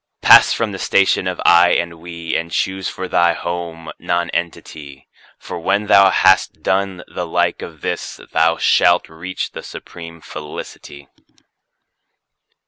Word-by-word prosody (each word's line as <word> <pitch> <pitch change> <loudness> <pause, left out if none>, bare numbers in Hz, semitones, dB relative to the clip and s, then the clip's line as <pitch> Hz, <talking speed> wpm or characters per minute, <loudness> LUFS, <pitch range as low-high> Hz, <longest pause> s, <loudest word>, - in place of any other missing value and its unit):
Pass - - +8
from 115 -2 -1
the 95 - -7
station 95 -1 +1
of 90 -1 -4
"I" 85 0 +6
and 85 -1 -2
"We," 85 -1 -6
and 85 0 -3
choose 95 +2 -2
for 95 - -6
thy 85 -1 +2
home 85 -1 -6
Nonentity, 85 -4 -4 0.3
For - - -8
when 105 +1 0
thou 100 -1 +6
has 95 0 +4
done 95 -2 -3
the 90 - -6
like - - -1
of 80 -4 -10
this, - - -5
thou 80 +1 +2
shalt 90 +1 +3
reach 90 +4 -6
the - - -8
supreme 85 -1 -11
Felicity. 75 -2 -10
85 Hz, 135 wpm, -18 LUFS, 80-95 Hz, 0.3 s, Pass